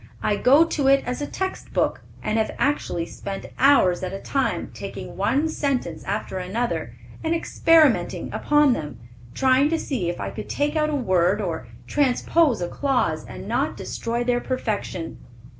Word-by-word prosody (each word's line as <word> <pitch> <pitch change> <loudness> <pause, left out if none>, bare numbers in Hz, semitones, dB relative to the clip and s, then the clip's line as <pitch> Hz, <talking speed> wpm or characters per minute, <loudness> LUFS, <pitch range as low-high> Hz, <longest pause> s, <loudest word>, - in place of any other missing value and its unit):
I 210 - +2
go 280 +9 +5
to 290 -4 -1
it 275 0 +5
as 250 +3 -3
a 290 - -2
text 380 0 -4
book, - - 0 0.2
and 215 +1 0
have 220 - -1
actually 275 -12 0
spent 195 +3 -7
hours 265 -10 +5
at 185 -1 -3
a - - -3
time, 270 +4 -1
taking - - -7
one 290 +4 +1
sentence 270 - -2
after 195 -1 -3
another, 215 +7 -3 0.3
and 325 +1 +1
experimenting 325 -4 +3
upon 295 -3 +3
them, 150 - -5 0.4
trying 265 +2 +4
to 330 - +1
see 245 - -2
if 175 - -4
I - - -3
could - - -7
take 295 +2 0
out 305 -1 +2
a 300 - -1
word 185 -6 +2
or 165 - -3 0.2
transpose 280 - +2
a - - -1
clause, 270 +5 0
and - - -9
not - - -1
destroy 235 +1 -3
their 245 0 +1
perfection." 215 -9 -3
250 Hz, 170 wpm, -23 LUFS, 195-290 Hz, 0.4 s, go